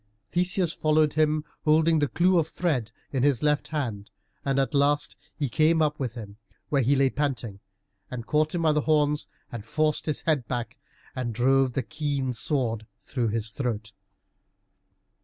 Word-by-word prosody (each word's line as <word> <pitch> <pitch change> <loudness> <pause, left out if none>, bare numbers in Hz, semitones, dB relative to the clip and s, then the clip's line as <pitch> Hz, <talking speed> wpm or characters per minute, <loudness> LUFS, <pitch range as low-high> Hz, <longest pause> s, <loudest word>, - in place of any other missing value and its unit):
Theseus 180 0 +1
followed 155 -1 +2
him, 155 -1 +1 0.2
holding 160 +1 +4
the 145 - +2
clue 180 +4 +3
of 160 - 0
thread 150 -10 -1 0.2
in 135 - 0
his 140 -2 +2
left 150 -1 +2
hand, 115 -10 -3 0.3
and 135 -1 0
at 135 +2 +1
last 145 +1 +2 0.2
he 145 - 0
came 155 +6 +3
up 150 -1 +1
with 125 -4 -3
him, 105 -3 -9 0.3
where 140 -2 +2
he 135 +4 +3
lay 135 -1 +3
panting, 125 -8 -2 0.5
and 120 -2 -6
caught 155 +4 +1
him 170 - -1
by 160 - +4
the 150 0 +2
horns, 150 -1 +1 0.2
and 115 -3 -6
forced 155 +6 0
his 155 - -1
head 145 -8 0
back, 120 -1 -4 0.4
and 120 -4 -3
drove 130 +1 +3
the 135 - -1
keen 140 0 -2
sword 115 -1 -1
through 125 -4 -2
his 110 +1 -2
throat. 115 -4 -3
140 Hz, 170 wpm, -26 LUFS, 120-155 Hz, 0.5 s, holding